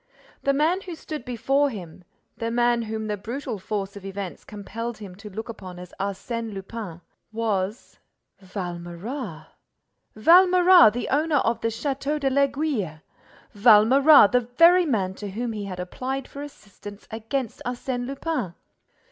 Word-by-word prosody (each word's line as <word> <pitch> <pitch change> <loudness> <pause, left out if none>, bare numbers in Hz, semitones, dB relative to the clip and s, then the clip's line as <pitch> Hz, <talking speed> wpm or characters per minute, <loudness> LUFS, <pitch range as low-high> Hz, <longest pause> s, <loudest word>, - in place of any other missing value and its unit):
The 275 - +2
man 315 +7 +1
who 360 -3 -7
stood 310 -1 -7
before 270 +4 +1
him, 180 -6 -9 0.3
the 230 - -3
man 240 0 +2
whom 220 -1 -4
the 210 -1 -2
brutal 235 +2 -5
force 200 0 -4
of 200 - -10
events 195 -1 -6
compelled 225 +3 -6
him 200 -4 -9
to 210 +1 -10
look 220 +3 -6
upon 185 -6 -9
as 180 0 -11
Arsène 220 +3 -4
Lupin, 195 -3 -7 0.3
was—Valméras! 190 - -5 0.7
Valméras, 360 - +7
the 245 - -3
owner 305 +3 +1
of 230 -3 0
the - - 0
Château 275 +5 -2
de 270 -2 0
l'Aiguille! 275 - 0 0.5
Valméras, 230 +5 +7
the 250 - +4
very 335 +9 +5
man 195 -8 0
to 205 +1 -7
whom 230 +4 -3
he 210 -2 -5
had 185 -2 -6
applied 255 +9 -4
for 280 - -9
assistance 205 -7 -11
against 230 +4 -4
Arsène 245 0 -3
Lupin! 270 - -3
230 Hz, 140 wpm, -24 LUFS, 200-275 Hz, 0.7 s, Valméras